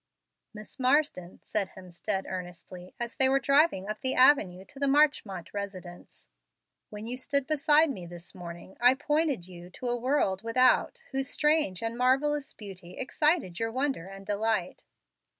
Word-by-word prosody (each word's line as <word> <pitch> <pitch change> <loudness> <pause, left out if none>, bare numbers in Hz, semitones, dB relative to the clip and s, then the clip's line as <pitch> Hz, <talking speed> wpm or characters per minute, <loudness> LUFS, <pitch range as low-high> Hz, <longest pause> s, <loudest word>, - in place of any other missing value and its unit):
"Miss 215 +4 -12
Marsden," 255 - +1
said 200 -3 -2
Hemstead, 190 +2 -4
earnestly, 180 0 -8
as 235 -1 -4
they 265 0 +4
were 270 +1 +3
driving 275 - +3
up 215 0 -5
the 260 - 0
avenue 200 -9 +4
to 280 +4 -14
the 280 - +1
Marchmont 270 - +1
residence, 190 -3 -8 0.6
"when 210 +1 -8
you 245 +2 -4
stood 280 +1 -1
beside 305 +1 +3
me 180 -9 -7
this 175 0 -10
morning 175 +1 -10
I 245 +2 +6
pointed 295 - 0
you 175 -1 -11
to 245 +7 -5
a 240 0 -1
world 235 -7 +1
without, 255 - +2
whose 270 0 -2
strange 300 - +1
and 225 0 -2
marvellous 270 +4 +1
beauty 185 -4 -11
excited 295 - 0
your 225 0 -1
wonder 260 -7 -2
and 195 0 -11
delight. 205 -2 -1
230 Hz, 155 wpm, -28 LUFS, 185-275 Hz, 0.6 s, I